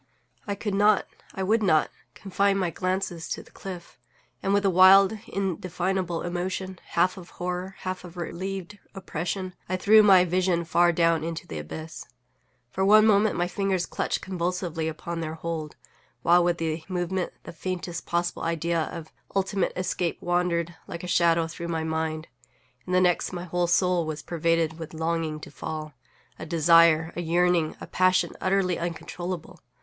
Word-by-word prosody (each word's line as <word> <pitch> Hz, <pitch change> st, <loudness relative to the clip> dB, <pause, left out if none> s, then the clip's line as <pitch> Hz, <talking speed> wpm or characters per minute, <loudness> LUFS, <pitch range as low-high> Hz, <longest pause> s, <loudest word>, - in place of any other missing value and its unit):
I 200 Hz, -, -1 dB
could 205 Hz, 0 st, -3 dB
not, 205 Hz, +1 st, +4 dB, 0.3 s
I 190 Hz, -, -2 dB
would 220 Hz, +4 st, +2 dB
not, 155 Hz, -7 st, +3 dB, 0.2 s
confine 195 Hz, 0 st, +1 dB
my 180 Hz, -3 st, 0 dB
glances 185 Hz, -2 st, -2 dB
to -, -, -4 dB
the -, -, -21 dB
cliff; 180 Hz, -3 st, -9 dB, 0.4 s
and, 195 Hz, -, 0 dB
with 200 Hz, 0 st, +2 dB
a -, -, +5 dB
wild, 190 Hz, +3 st, +7 dB
indefinable 185 Hz, -2 st, -2 dB
emotion, 185 Hz, +1 st, -3 dB
half 180 Hz, +3 st, +1 dB
of 180 Hz, -2 st, -10 dB
horror, 180 Hz, +2 st, -4 dB
half 185 Hz, -1 st, -4 dB
of 180 Hz, 0 st, -11 dB
a -, -, -5 dB
relieved 190 Hz, +3 st, -5 dB, 0.2 s
oppression, 185 Hz, 0 st, -4 dB, 0.2 s
I 185 Hz, -, 0 dB
threw 215 Hz, +3 st, +6 dB
my 190 Hz, -3 st, +6 dB
vision 180 Hz, -1 st, +1 dB
far 175 Hz, +1 st, +4 dB
down 165 Hz, -1 st, +2 dB
into 165 Hz, 0 st, -4 dB
the 80 Hz, -, -6 dB
abyss. 155 Hz, -, -8 dB, 0.6 s
For 190 Hz, -, -1 dB
one 215 Hz, +2 st, +7 dB
moment 215 Hz, 0 st, +4 dB
my 175 Hz, 0 st, +1 dB
fingers 190 Hz, -1 st, -1 dB
clutched -, -, -2 dB
convulsively 175 Hz, -3 st, -2 dB
upon 165 Hz, +2 st, -5 dB
their 160 Hz, 0 st, -4 dB
hold, 160 Hz, -2 st, -5 dB, 0.5 s
while, 175 Hz, +1 st, +5 dB
with 175 Hz, -1 st, +1 dB
the 160 Hz, -1 st, -2 dB
movement, 180 Hz, 0 st, -2 dB
the -, -, -9 dB
faintest 175 Hz, -1 st, -5 dB
possible 175 Hz, 0 st, -1 dB
idea 165 Hz, 0 st, 0 dB
of 160 Hz, -2 st, -8 dB, 0.2 s
ultimate 195 Hz, -1 st, 0 dB
escape 180 Hz, -2 st, -2 dB
wandered, 175 Hz, -1 st, 0 dB
like 170 Hz, -, -7 dB
a -, -, -5 dB
shadow, 170 Hz, -1 st, +3 dB
through 170 Hz, +1 st, -6 dB
my 165 Hz, -1 st, -2 dB
mind—in 155 Hz, -4 st, -6 dB
the 185 Hz, 0 st, +4 dB
next 180 Hz, 0 st, +1 dB
my 175 Hz, -1 st, -4 dB
whole 175 Hz, 0 st, -1 dB
soul 175 Hz, -1 st, +2 dB
was 150 Hz, -1 st, -5 dB
pervaded 165 Hz, -1 st, 0 dB
with 160 Hz, 0 st, -8 dB
a -, -, -8 dB
longing 160 Hz, -1 st, -1 dB
to -, -, -10 dB
fall; 155 Hz, 0 st, -6 dB, 0.5 s
a -, -, -6 dB
desire, 165 Hz, 0 st, +5 dB
a 175 Hz, -, -2 dB
yearning, 175 Hz, -1 st, +1 dB
a -, -, -7 dB
passion 185 Hz, 0 st, +2 dB
utterly 185 Hz, -2 st, +1 dB
uncontrollable. 175 Hz, +1 st, -5 dB
175 Hz, 165 wpm, -26 LUFS, 165-185 Hz, 0.6 s, wild